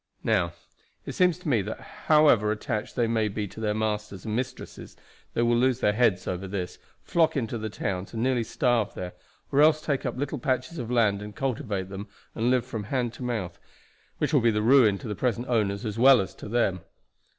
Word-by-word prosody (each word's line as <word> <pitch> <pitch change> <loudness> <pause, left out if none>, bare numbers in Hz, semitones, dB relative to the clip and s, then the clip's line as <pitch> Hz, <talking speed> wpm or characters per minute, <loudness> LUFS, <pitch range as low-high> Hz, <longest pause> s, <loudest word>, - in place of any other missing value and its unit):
Now, 95 -6 +1 0.5
it - - -4
seems 180 -2 +3
to 180 -1 -10
me 120 -7 +3
that 105 +3 -5 0.3
however 145 -9 +5
attached 105 0 -3
they 120 - +2
may 110 -1 +1
be 105 0 -3
to 105 - -11
their 105 -1 -1
masters 105 -3 -3
and 110 -1 -2
mistresses 125 +1 -6 0.4
they 120 - +2
will 120 0 +3
lose 130 +1 +2
their 105 - +2
heads 110 -5 +2
over 95 +1 -3
this, 95 -2 -5 0.2
flock 160 -2 +2
into 115 -2 -2
the 110 0 -4
towns, 95 -2 -4
and 115 0 -3
nearly 130 -2 +1
starve 120 -1 0
there; 90 -1 -6 0.4
or 140 - +4
else 155 0 +5
take 145 -3 -2
up - - -3
little 145 +1 -3
patches 130 +6 -2
of 120 -2 -5
land 110 -5 +2
and 105 0 -8
cultivate 110 -8 -2
them, 100 +2 -7 0.3
and 115 +2 0
live 125 -1 +2
from 115 -5 -5
hand 120 0 -1
to - - -12
mouth, 105 -8 -3 0.6
which - - -1
will 140 - +5
be 115 - +4
ruin 110 0 +4
to 115 - -8
the 105 - -2
present 120 +3 -1
owners 105 -2 0
as 110 +1 -4
well 130 0 +7
as 95 - -3
to - - -10
them. 105 -5 +1
115 Hz, 210 wpm, -26 LUFS, 105-130 Hz, 0.6 s, well